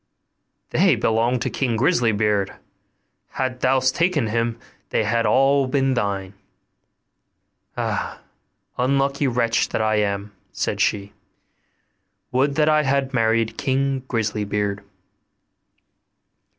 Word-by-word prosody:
'They 180 -3 +4
belong 115 +2 +1
to - - -2
King 125 -4 -1
Grisly 120 -2 +2
beard, 105 -2 0 0.8
hadst 130 -1 -2
thou 130 +1 +3
taken 150 +2 +1
him, 115 +1 -1 0.3
they - - +1
had 115 -1 +1
all 135 0 +3
been 135 0 +1
thine.' 100 -5 -2 1.4
'Ah! - - -3 0.6
unlucky 140 +2 +1
wretch 115 -2 +1
that - - -2
I 110 0 +1
am!' 100 0 -2 0.2
said - - -2
she; 100 -1 0 1.2
'would 140 +3 +1
that 150 0 +2
I 155 0 +4
had 135 -1 0
married 115 -2 +1
King 135 0 0
Grisly 110 -3 -1
beard! 100 0 -2
125 Hz, 110 wpm, -22 LUFS, 110-135 Hz, 1.4 s, They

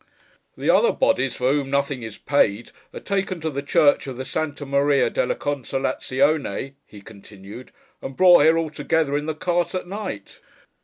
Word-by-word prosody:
'The - - -5
other 475 - +4
bodies, 135 - +1
for 125 +1 0
whom 140 -2 -1
nothing 140 -1 -1
is 110 -2 -8
paid, 120 -6 0 0.2
are - - -8
taken 195 -2 -2
to 160 0 -3
the 140 0 -4
church 145 0 +2
of 130 -2 -6
the 130 - -5
Santa 145 +1 -4
Maria 140 0 +2
della - - -1
Consolázione,' 135 - -2
he 105 - -14
continued, 105 +2 -13 0.3
'and 135 - -8
brought 180 -3 +7
here 160 +2 +4
altogether, 155 -1 -1
in 150 +1 -2
the 155 - -2
cart 175 +2 -1
at 185 - -3
night. 190 - -7
145 Hz, 165 wpm, -22 LUFS, 130-160 Hz, 0.3 s, brought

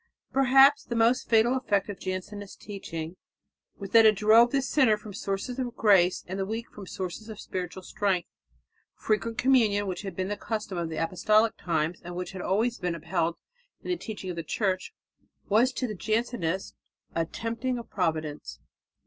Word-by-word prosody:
Perhaps 270 +2 +6
the 235 - -4
most 230 +2 +2
fatal 230 +2 +4
effect 205 -7 0
of 205 -3 -7
Jansenist 195 +2 -6
teaching 175 -4 -7 0.6
was 195 -2 -8
that 225 +1 +8
it 215 -1 +6
drove 220 +4 +6
the 275 -1 +1
sinner 260 -6 +3
from 210 0 -10
the - - -10
sources 200 +7 -3
of 245 -2 -3
grace 190 -6 +4
and 190 +2 -4
the 195 - 0
weak 225 +2 -5
from 205 - -10
the - - -12
sources 190 +4 -5
of 215 - -8
spiritual 185 0 -5
strength. 190 -2 -1 0.7
Frequent 220 +1 -1
communion, 225 -6 +3
which 185 -2 -4
had 195 -4 -6
been 185 +1 -2
the 205 - -2
custom 210 -3 -4
in 165 -1 -3
apostolic 200 +7 +2
times 165 0 -1
and 175 0 -8
which 180 0 -4
had 190 - -8
been - - -4
always 225 +3 0
upheld 170 0 -1 0.5
in - - -7
the - - +2
teaching 210 - -6
of - - -6
the 170 - -3
Church, 185 +3 -1 0.6
was 230 +5 +4
to 255 - -2
the 220 - -3
Jansenist 215 -4 -2 0.4
a 165 - +1
tempting 230 +7 -3
of 235 - -7
Providence. 160 -5 -2
205 Hz, 185 wpm, -27 LUFS, 180-230 Hz, 0.7 s, that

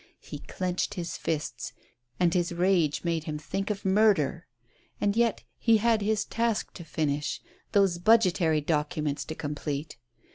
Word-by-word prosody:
He - - -8
clenched 180 -1 -3
his 175 -2 -4
fists, 145 -7 -3 0.5
and 175 -2 +3
his 175 -1 +1
rage 170 -4 +2
made 165 -2 -1
him 150 -2 -3
think 195 +6 -3
of 205 -2 -3
murder. 190 -5 +3 0.5
And 205 0 +1
yet 235 -1 +2 0.2
he 230 -1 +5
had 225 0 +2
his 215 +1 +1
task 230 -2 -1
to 170 - -9
finish 150 -2 -1 0.2
— 370 - -35
those 195 -4 +3
budgetary 175 -6 +4
documents 150 -1 -1
to 155 - -6
complete. 145 -1 -4
175 Hz, 150 wpm, -28 LUFS, 150-205 Hz, 0.5 s, he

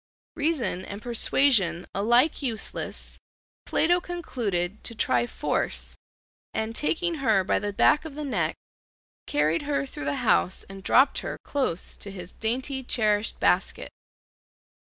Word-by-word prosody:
Reason 290 - 0
and 200 +1 -7
persuasion 225 -6 +3
alike 240 +11 +3
useless, 235 -6 -4 0.5
Plato 350 +2 +3
concluded 215 - -3
to 230 - -6
try 120 - +1
force 65 - -2 0.6
and, 220 +1 -2
taking 330 +3 -1
her 220 -7 +3
by 185 - +1
the 205 0 -3
back 295 +9 +4
of 315 -3 -8
the 300 - -4
neck, 175 - 0 0.7
carried 150 +3 +2
her 285 -1 -1
through 205 - -7
the 140 0 0
house 185 - +2
and 195 0 -10
dropped 260 +8 +4
her - - -5
close 255 - -2
to 200 - -7
his 180 -2 -8
dainty 260 +4 -2
cherished 215 -4 0
basket. - - +1
225 Hz, 135 wpm, -26 LUFS, 185-280 Hz, 0.7 s, back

